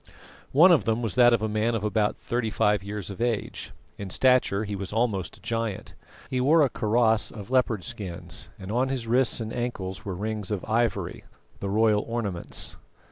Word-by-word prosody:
One 170 Hz, +7 st, +7 dB
of 165 Hz, -, +4 dB
them 115 Hz, +1 st, 0 dB
was 110 Hz, -5 st, -1 dB
that 120 Hz, -1 st, +6 dB
of 115 Hz, -2 st, +2 dB
a -, -, +1 dB
man 110 Hz, +2 st, 0 dB
of 110 Hz, -, -2 dB
about 105 Hz, 0 st, +1 dB
thirty 120 Hz, -2 st, -2 dB
five 105 Hz, -2 st, +2 dB
years 100 Hz, -1 st, -5 dB
of 100 Hz, -, -8 dB
age. 120 Hz, -3 st, -2 dB, 0.3 s
In 100 Hz, -1 st, -5 dB
stature 125 Hz, -3 st, +3 dB
he 105 Hz, -1 st, -4 dB
was 100 Hz, -1 st, -5 dB
almost 105 Hz, -6 st, -1 dB
a -, -, -21 dB
giant. 115 Hz, -4 st, -3 dB, 0.4 s
He 130 Hz, -1 st, 0 dB
wore 155 Hz, +4 st, +5 dB
a 135 Hz, -, +1 dB
kaross 110 Hz, 0 st, +2 dB
of 105 Hz, +2 st, -9 dB
leopard 120 Hz, -7 st, +2 dB
skins, 90 Hz, +1 st, -6 dB
and 95 Hz, 0 st, -7 dB
on 125 Hz, +3 st, +1 dB
his 130 Hz, -3 st, -2 dB
wrists 125 Hz, +2 st, +2 dB
and 110 Hz, -1 st, -4 dB
ankles 110 Hz, -6 st, -4 dB
were 100 Hz, -5 st, -4 dB
rings 105 Hz, 0 st, -3 dB
of 105 Hz, -3 st, -3 dB
ivory, 115 Hz, 0 st, -1 dB, 0.3 s
the 100 Hz, -, -3 dB
royal 105 Hz, 0 st, +3 dB
ornaments. 105 Hz, -7 st, -3 dB
110 Hz, 190 wpm, -26 LUFS, 100-120 Hz, 0.4 s, One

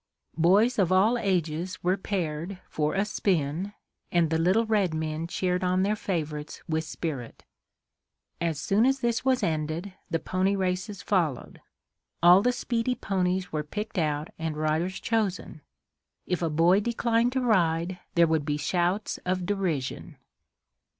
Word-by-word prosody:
Boys 210 Hz, +8 st, +4 dB
of 185 Hz, -2 st, +3 dB
all 200 Hz, +6 st, +4 dB
ages 180 Hz, -5 st, -1 dB
were 180 Hz, +2 st, +3 dB
paired 180 Hz, -2 st, -3 dB
for 150 Hz, +2 st, -1 dB
a 195 Hz, +1 st, +2 dB
"spin," 180 Hz, -2 st, -1 dB, 0.4 s
and 170 Hz, -2 st, +2 dB
the 160 Hz, -, +2 dB
little 190 Hz, +7 st, +3 dB
red 205 Hz, -7 st, +1 dB
men 155 Hz, +1 st, -3 dB
cheered 180 Hz, +1 st, -1 dB
on 185 Hz, +1 st, +2 dB
their 205 Hz, +2 st, +1 dB
favorites 155 Hz, -7 st, -4 dB
with 160 Hz, 0 st, 0 dB
spirit. 150 Hz, -7 st, -6 dB, 1.0 s
As 165 Hz, -4 st, -1 dB
soon 210 Hz, +8 st, +3 dB
as 270 Hz, 0 st, +1 dB
this 235 Hz, -1 st, 0 dB
was 260 Hz, -1 st, +2 dB
ended, 160 Hz, +4 st, -2 dB, 0.2 s
the 165 Hz, -, +1 dB
pony 185 Hz, +4 st, 0 dB
races 185 Hz, +1 st, -2 dB
followed. 165 Hz, -10 st, -1 dB, 0.6 s
All 175 Hz, +2 st, +8 dB
the 250 Hz, +4 st, +3 dB
speedy 245 Hz, 0 st, -1 dB
ponies 185 Hz, -3 st, -1 dB
were 155 Hz, -, -1 dB
picked 210 Hz, +6 st, -4 dB
out 150 Hz, -1 st, -1 dB
and 160 Hz, -2 st, -3 dB
riders 155 Hz, +5 st, 0 dB
chosen. 200 Hz, -8 st, -2 dB, 0.6 s
If 180 Hz, -, -1 dB
a 165 Hz, -, +1 dB
boy 170 Hz, +5 st, +4 dB
declined 235 Hz, +2 st, +1 dB
to 260 Hz, -, 0 dB
ride, 180 Hz, -6 st, +1 dB, 0.2 s
there 170 Hz, -1 st, +6 dB
would 160 Hz, -2 st, +1 dB
be 145 Hz, 0 st, -1 dB
shouts 180 Hz, +6 st, 0 dB
of 180 Hz, 0 st, -1 dB
derision. 175 Hz, -9 st, -2 dB
180 Hz, 150 wpm, -27 LUFS, 160-200 Hz, 1.0 s, All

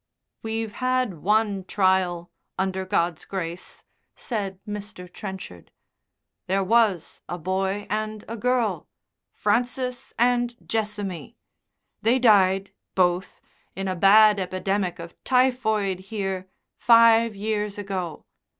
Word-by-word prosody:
"We've 225 Hz, 0 st, -3 dB
had 255 Hz, -, -1 dB
one 210 Hz, -1 st, +1 dB
trial, 185 Hz, -3 st, +1 dB, 0.3 s
under 190 Hz, 0 st, -1 dB
God's 170 Hz, -4 st, 0 dB
grace," 180 Hz, -2 st, -6 dB, 0.3 s
said 200 Hz, -5 st, -4 dB
Mr. 205 Hz, -3 st, -7 dB
Trenchard. 185 Hz, -, -9 dB, 0.8 s
"There 195 Hz, +1 st, +1 dB
was 205 Hz, -5 st, +1 dB
a 175 Hz, -, -3 dB
boy 190 Hz, +3 st, -2 dB
and 215 Hz, +1 st, -3 dB
a 230 Hz, -, -5 dB
girl 245 Hz, 0 st, 0 dB, 0.4 s
Francis 250 Hz, 0 st, -1 dB
and 240 Hz, 0 st, +2 dB
Jessamy. 205 Hz, -7 st, -3 dB, 0.6 s
They 230 Hz, +4 st, +3 dB
died, 195 Hz, -5 st, +4 dB, 0.2 s
both, 180 Hz, 0 st, +1 dB, 0.3 s
in 195 Hz, 0 st, -3 dB
a 185 Hz, -, -1 dB
bad 205 Hz, +3 st, +6 dB
epidemic 185 Hz, 0 st, -1 dB
of 170 Hz, 0 st, -11 dB
typhoid 220 Hz, -7 st, +1 dB
here, 190 Hz, -2 st, -4 dB, 0.3 s
five 230 Hz, -1 st, +5 dB
years 210 Hz, 0 st, -2 dB
ago. 190 Hz, -5 st, -5 dB
200 Hz, 105 wpm, -24 LUFS, 185-225 Hz, 0.8 s, bad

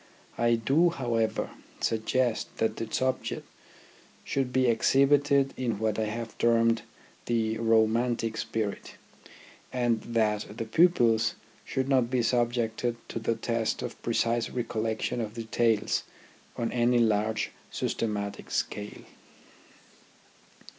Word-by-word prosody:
I 120 Hz, 0 st, +4 dB
do, 140 Hz, +10 st, +3 dB
however, 120 Hz, -8 st, -1 dB, 0.3 s
suggest 115 Hz, +1 st, 0 dB
that 110 Hz, -, 0 dB
the 115 Hz, -1 st, -5 dB
subject 130 Hz, 0 st, -1 dB, 0.8 s
should 135 Hz, -2 st, -1 dB
be 130 Hz, 0 st, +2 dB
exhibited 140 Hz, +3 st, +3 dB
in 120 Hz, -5 st, -1 dB
what 110 Hz, 0 st, -1 dB
I 110 Hz, -, +1 dB
have 110 Hz, +1 st, -5 dB
termed 115 Hz, -1 st, +3 dB, 0.5 s
the 110 Hz, -2 st, 0 dB
romantic 115 Hz, 0 st, +2 dB
spirit, 110 Hz, -2 st, -3 dB, 0.8 s
and 120 Hz, -3 st, +1 dB
that 110 Hz, -2 st, -1 dB
the 115 Hz, -, -3 dB
pupils 115 Hz, -6 st, +3 dB, 0.3 s
should 130 Hz, 0 st, -2 dB
not 130 Hz, -4 st, +3 dB
be 125 Hz, -2 st, +1 dB
subjected 120 Hz, -1 st, 0 dB
to -, -, -3 dB
the 115 Hz, +1 st, 0 dB
test 115 Hz, 0 st, -1 dB
of -, -, -6 dB
precise 115 Hz, 0 st, 0 dB
recollection 115 Hz, -1 st, -2 dB
of 110 Hz, 0 st, -5 dB
details 115 Hz, -1 st, +1 dB, 0.6 s
on 115 Hz, -1 st, -1 dB
any 120 Hz, 0 st, +3 dB
large 110 Hz, -1 st, +1 dB, 0.2 s
systematic 105 Hz, -3 st, -3 dB
scale. 105 Hz, 0 st, -3 dB
115 Hz, 115 wpm, -28 LUFS, 110-125 Hz, 0.8 s, I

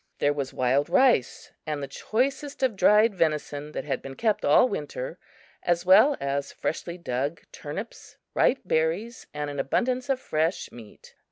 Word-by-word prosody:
There 145 Hz, -, +2 dB
was 140 Hz, -2 st, -4 dB
wild 130 Hz, +3 st, +1 dB
rice 255 Hz, -, +2 dB, 0.2 s
and 150 Hz, -2 st, -3 dB
the -, -, -4 dB
choicest 270 Hz, -, -2 dB
of 250 Hz, -5 st, +2 dB
dried 210 Hz, +3 st, +5 dB
venison 150 Hz, -3 st, -1 dB
that -, -, -4 dB
had 145 Hz, -, -2 dB
been 135 Hz, 0 st, -8 dB
kept 220 Hz, -, 0 dB
all 150 Hz, -, +5 dB
winter, -, -, -5 dB, 0.4 s
as 175 Hz, 0 st, 0 dB
well 260 Hz, +10 st, +6 dB
as 140 Hz, 0 st, -2 dB
freshly 170 Hz, +2 st, -4 dB
dug 140 Hz, 0 st, -3 dB
turnips, 180 Hz, +10 st, -8 dB, 0.2 s
ripe 265 Hz, -, +2 dB
berries 180 Hz, +9 st, -1 dB
and 150 Hz, 0 st, -4 dB
an 145 Hz, -, -6 dB
abundance 250 Hz, -, 0 dB
of 270 Hz, -2 st, +1 dB
fresh 160 Hz, -5 st, -1 dB
meat. 115 Hz, -3 st, -14 dB
170 Hz, 160 wpm, -26 LUFS, 145-235 Hz, 0.4 s, well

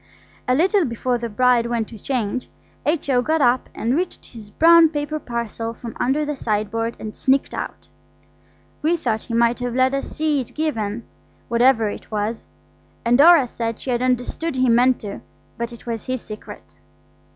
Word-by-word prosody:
A 250 Hz, -, +3 dB
little 380 Hz, +6 st, +3 dB
before 245 Hz, -1 st, -1 dB
the 235 Hz, 0 st, -4 dB
bride 240 Hz, +1 st, +3 dB
went 235 Hz, -2 st, -2 dB
to 225 Hz, -, -11 dB
change, 250 Hz, 0 st, -2 dB, 0.4 s
H.O. 285 Hz, -5 st, +2 dB
got 315 Hz, +5 st, +1 dB
up 250 Hz, -2 st, +2 dB
and 235 Hz, +4 st, 0 dB
reached 360 Hz, +3 st, -3 dB
his 220 Hz, -3 st, -10 dB
brown 330 Hz, +6 st, +6 dB
paper 300 Hz, 0 st, -3 dB
parcel 235 Hz, -2 st, -4 dB
from 230 Hz, -2 st, -8 dB
under 285 Hz, +4 st, +1 dB
the 295 Hz, 0 st, -3 dB
sideboard 225 Hz, 0 st, -2 dB
and 215 Hz, -1 st, -7 dB
sneaked 270 Hz, 0 st, +1 dB
out. -, -, -6 dB, 0.9 s
We 330 Hz, +3 st, +2 dB
thought 225 Hz, -8 st, -2 dB
he 230 Hz, -, -4 dB
might 235 Hz, +1 st, +3 dB
have 245 Hz, -1 st, -3 dB
let 260 Hz, +1 st, +3 dB
us 275 Hz, -, -2 dB
see 305 Hz, -3 st, 0 dB
it 245 Hz, -, -10 dB
given, 235 Hz, -8 st, -2 dB, 0.5 s
whatever 235 Hz, -1 st, +4 dB
it 205 Hz, -, -7 dB
was. 215 Hz, +1 st, -3 dB, 0.6 s
And 235 Hz, +1 st, +4 dB
Dora 325 Hz, -2 st, +8 dB
said 230 Hz, -2 st, -4 dB
she 260 Hz, -, -4 dB
had 240 Hz, 0 st, 0 dB
understood 255 Hz, +5 st, -1 dB
he 255 Hz, -1 st, +2 dB
meant 245 Hz, +2 st, +4 dB
to; 200 Hz, -2 st, -6 dB, 0.4 s
but 235 Hz, 0 st, -4 dB
it 235 Hz, -, -12 dB
was 230 Hz, -2 st, -5 dB
his 255 Hz, -2 st, -3 dB
secret. 215 Hz, 0 st, -11 dB
245 Hz, 175 wpm, -21 LUFS, 230-280 Hz, 0.9 s, Dora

